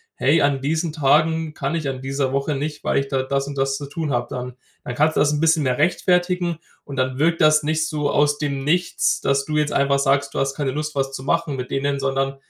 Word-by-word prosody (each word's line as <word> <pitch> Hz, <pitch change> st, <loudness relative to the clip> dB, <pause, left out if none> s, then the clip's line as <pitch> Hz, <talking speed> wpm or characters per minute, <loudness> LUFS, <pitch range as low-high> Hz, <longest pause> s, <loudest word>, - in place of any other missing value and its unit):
„Hey, 150 Hz, +4 st, +3 dB
an 140 Hz, -1 st, +2 dB
diesen 160 Hz, +3 st, -1 dB
Tagen 155 Hz, +2 st, +2 dB
kann 140 Hz, +1 st, -3 dB
ich 155 Hz, -4 st, -2 dB
an 130 Hz, -1 st, -4 dB
dieser 135 Hz, 0 st, -2 dB
Woche 140 Hz, +1 st, 0 dB
nicht, 150 Hz, +2 st, -4 dB
weil -, -, +1 dB
ich 140 Hz, -, -3 dB
da 135 Hz, -2 st, 0 dB
das 140 Hz, +1 st, -1 dB
und 140 Hz, -1 st, -6 dB
das 135 Hz, 0 st, 0 dB
zu 145 Hz, -, -6 dB
tun 150 Hz, +1 st, -4 dB
habe 120 Hz, -1 st, -1 dB
dann.“ 125 Hz, 0 st, -5 dB, 0.3 s
Dann 125 Hz, -, -5 dB
kannst 155 Hz, +3 st, +2 dB
du -, -, +2 dB
das 145 Hz, 0 st, +3 dB
'n 150 Hz, -, -1 dB
bisschen 160 Hz, -1 st, +3 dB
mehr 130 Hz, -2 st, 0 dB
rechtfertigen. 175 Hz, +1 st, +1 dB, 0.3 s
Und 140 Hz, -, -8 dB
dann 130 Hz, +1 st, -1 dB
wirkt 165 Hz, +2 st, +2 dB
das 155 Hz, 0 st, +5 dB
nicht 155 Hz, +1 st, 0 dB
so 150 Hz, -2 st, -1 dB
aus 145 Hz, 0 st, +2 dB
dem 140 Hz, -2 st, -2 dB
Nichts, 175 Hz, +4 st, +1 dB
dass 140 Hz, 0 st, +1 dB
du 150 Hz, 0 st, -2 dB
jetzt 150 Hz, 0 st, 0 dB
einfach 140 Hz, 0 st, +2 dB
sagst, 140 Hz, 0 st, +1 dB
du -, -, -2 dB
hast 135 Hz, 0 st, -1 dB
keine 140 Hz, -3 st, -1 dB
Lust, 150 Hz, +1 st, -4 dB
was 135 Hz, 0 st, -1 dB
zu 130 Hz, -, -6 dB
machen 165 Hz, -1 st, 0 dB
mit 125 Hz, -1 st, -5 dB
denen, 140 Hz, 0 st, -1 dB
sondern 135 Hz, 0 st, -1 dB
145 Hz, 250 wpm, -21 LUFS, 135-155 Hz, 0.3 s, das